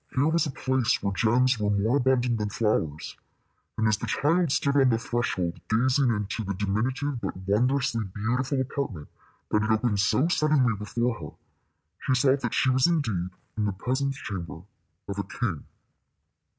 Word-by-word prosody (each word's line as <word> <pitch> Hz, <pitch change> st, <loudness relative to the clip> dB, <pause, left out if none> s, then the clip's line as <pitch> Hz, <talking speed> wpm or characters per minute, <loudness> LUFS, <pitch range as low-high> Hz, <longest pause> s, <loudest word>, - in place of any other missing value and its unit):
Here 140 Hz, +3 st, +3 dB
was 165 Hz, 0 st, +2 dB
a -, -, -3 dB
place 130 Hz, -3 st, 0 dB
where 100 Hz, -1 st, 0 dB
gems 120 Hz, +4 st, +2 dB
were 105 Hz, -1 st, 0 dB
more 105 Hz, +6 st, +2 dB
abundant 125 Hz, -3 st, +2 dB
than 105 Hz, -1 st, -1 dB
flowers; 80 Hz, -9 st, -1 dB, 0.6 s
and 110 Hz, -, +2 dB
as 110 Hz, -1 st, +2 dB
the -, -, -5 dB
child 165 Hz, +2 st, +1 dB
stood 140 Hz, 0 st, +1 dB
on 135 Hz, -2 st, +5 dB
the 115 Hz, -, +2 dB
threshold 95 Hz, -7 st, -2 dB
gazing 130 Hz, +4 st, +3 dB
into 105 Hz, 0 st, -2 dB
the 100 Hz, -1 st, -3 dB
diminutive 120 Hz, +7 st, -1 dB
but 95 Hz, -, -4 dB
wondrously 115 Hz, +1 st, +1 dB
beautiful 120 Hz, +8 st, -1 dB
apartment 125 Hz, -, -4 dB, 0.4 s
that 105 Hz, -, +3 dB
had 110 Hz, -, -1 dB
opened 110 Hz, -1 st, +1 dB
so 115 Hz, +9 st, +3 dB
suddenly 150 Hz, -8 st, +2 dB
before 115 Hz, +3 st, -2 dB
her, 75 Hz, -, -9 dB, 0.6 s
she 130 Hz, -, 0 dB
saw 135 Hz, 0 st, +4 dB
that 120 Hz, -4 st, -3 dB
she 130 Hz, -, +3 dB
was 130 Hz, +2 st, +4 dB
indeed 110 Hz, -, 0 dB, 0.3 s
in 105 Hz, -1 st, -1 dB
the 100 Hz, -, -1 dB
presence 130 Hz, +7 st, -2 dB
chamber 85 Hz, -, -6 dB, 0.4 s
of 100 Hz, 0 st, -4 dB
a -, -, 0 dB
king. 100 Hz, -5 st, -4 dB
115 Hz, 170 wpm, -26 LUFS, 105-130 Hz, 0.6 s, on